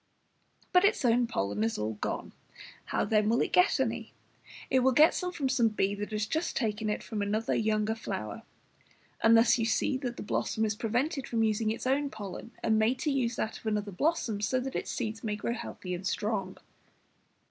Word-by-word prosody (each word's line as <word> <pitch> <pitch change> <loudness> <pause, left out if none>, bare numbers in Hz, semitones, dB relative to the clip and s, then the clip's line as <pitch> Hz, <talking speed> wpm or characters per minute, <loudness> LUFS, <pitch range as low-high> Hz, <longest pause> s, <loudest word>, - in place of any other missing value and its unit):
But 360 +1 +6
its 405 -9 +2
own 240 0 +4
pollen 100 - -1
is 115 - 0
all 110 +1 -2
gone, 105 - -4 0.5
how - - 0
then 215 0 +2
will 235 - +3
it - - 0
get 360 +2 +4
any? - - -2 0.6
It 260 - +5
will 260 +1 +3
get 305 +8 +5
it 360 -1 -4
from 280 -4 0
some 255 -3 +3
bee 205 -2 0
who 205 0 -4
has 215 -1 -2
just 320 +9 -2
taken 220 -3 -1
it 210 - -2
from 215 -3 -4
another 215 +2 0
and - - +1
younger 215 0 +1
flower; 225 - -5 0.8
and 225 0 +6
thus 230 +1 +5
you 225 - +1
see 230 +3 +1
the 260 -2 -3
blossom 220 +1 0
is 215 - 0
prevented 250 +6 -1
from 225 -1 +1
using 215 0 +1
its 225 - -3
own 280 +2 +1
pollen, 205 -1 -7
and 220 -1 +3
made 225 +4 +2
to 300 - +1
use 250 -4 0
that 220 - -3
of - - -9
another 210 -1 -1
blossom, 225 - 0
so 255 +5 +1
that 265 +1 -5
its - - -3
seeds 225 -2 -3
may 210 -2 -1
grow 225 +3 -2
healthy 185 -6 -6
and 185 +2 -3
strong. 200 -3 -2
225 Hz, 205 wpm, -30 LUFS, 210-255 Hz, 0.8 s, But